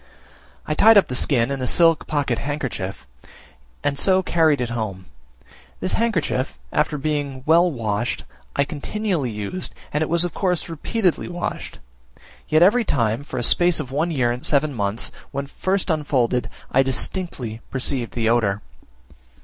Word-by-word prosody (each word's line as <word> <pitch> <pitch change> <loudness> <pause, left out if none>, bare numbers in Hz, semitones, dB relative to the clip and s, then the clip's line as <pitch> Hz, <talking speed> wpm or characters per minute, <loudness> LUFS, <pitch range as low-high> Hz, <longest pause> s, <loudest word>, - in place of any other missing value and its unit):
I 155 - -1
tied 220 +7 +7
up 200 - +4
the 125 - -3
skin 125 -1 +2
in 135 -1 -3
a 125 - -1
silk 165 +1 +4
pocket 140 -6 0
handkerchief, 130 - -4 0.8
and 140 -1 0
so 190 +2 +3
carried 160 -4 +3
it 120 -1 -2
home: 105 -6 -4 0.7
this 185 - -1
handkerchief, 175 - 0 0.2
after 150 0 +1
being 145 -3 -2
well 170 +3 +5
washed, 115 -3 -2 0.3
I 140 - +3
continually 160 - -2
used, 105 - -4 0.2
and 150 - 0
it 155 - 0
was 170 +1 +5
of 175 - -4
course 180 -4 0
as - - -11
repeatedly 180 +3 -1
washed; 175 0 -5 0.7
yet 155 +2 +5
every 230 +6 +5
time, 115 - 0
for 145 - -7
a 120 - -1
space 175 +7 +4
of 135 -4 -5
one 160 +5 0
year 130 -7 +1
and 125 +2 -5
seven 145 0 +2
months, 105 -1 -2 0.2
when 140 +1 -4
first 190 +6 -1
unfolded, 130 -6 0 0.2
I 135 - +4
distinctly 130 - -2
perceived 130 -2 -2
the 115 -2 0
odour. 110 -4 +1
145 Hz, 160 wpm, -22 LUFS, 120-170 Hz, 0.8 s, tied